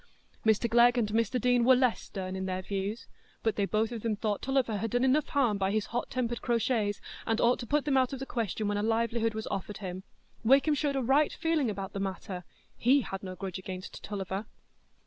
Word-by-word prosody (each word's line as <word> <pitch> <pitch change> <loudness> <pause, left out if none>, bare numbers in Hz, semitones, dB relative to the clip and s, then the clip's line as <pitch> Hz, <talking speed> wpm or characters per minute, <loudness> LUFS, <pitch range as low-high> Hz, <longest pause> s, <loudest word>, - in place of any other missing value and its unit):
Mr 220 +1 +3
Glegg 240 +2 +5
and 220 -3 +1
Mr 230 +4 +1
Deane 245 0 +3
were 260 +2 +7
less 250 -2 +2
stern 190 -1 -5
in 190 0 -3
their 185 0 -2
views, 200 +4 -3 0.4
but 225 - +1
they 200 - +1
both 215 +3 0
of 230 -2 -5
them 225 -1 0
thought 210 -1 -2
Tulliver 260 -5 +1
had 225 +3 -2
done 245 +3 +1
enough 270 +3 +3
harm 240 -8 +1
by 190 0 +1
his 215 +1 0
hot 240 - -1
tempered 240 -2 -2
crotchets 230 -3 0 0.3
and 225 0 +1
ought 240 +1 +3
to 240 - -6
put 295 +2 +1
them 280 -2 +2
out 255 -1 +3
of 270 - -4
the 270 - -5
question 220 -4 -2
when 205 0 0
a - - 0
livelihood 225 0 +1
was 220 - -3
offered 200 +1 -4
him; 185 -2 -5 0.4
Wakem 275 +6 +5
showed 290 -1 0
a 270 - 0
right 275 +5 +3
feeling 325 -6 +1
about 195 -2 -5
the 200 - -3
matter,—he 195 +7 -1
had 195 -5 -5
no 185 -1 -6
grudge 190 0 -5
against 185 0 -7
Tulliver. 195 0 -4
225 Hz, 220 wpm, -30 LUFS, 200-250 Hz, 0.4 s, were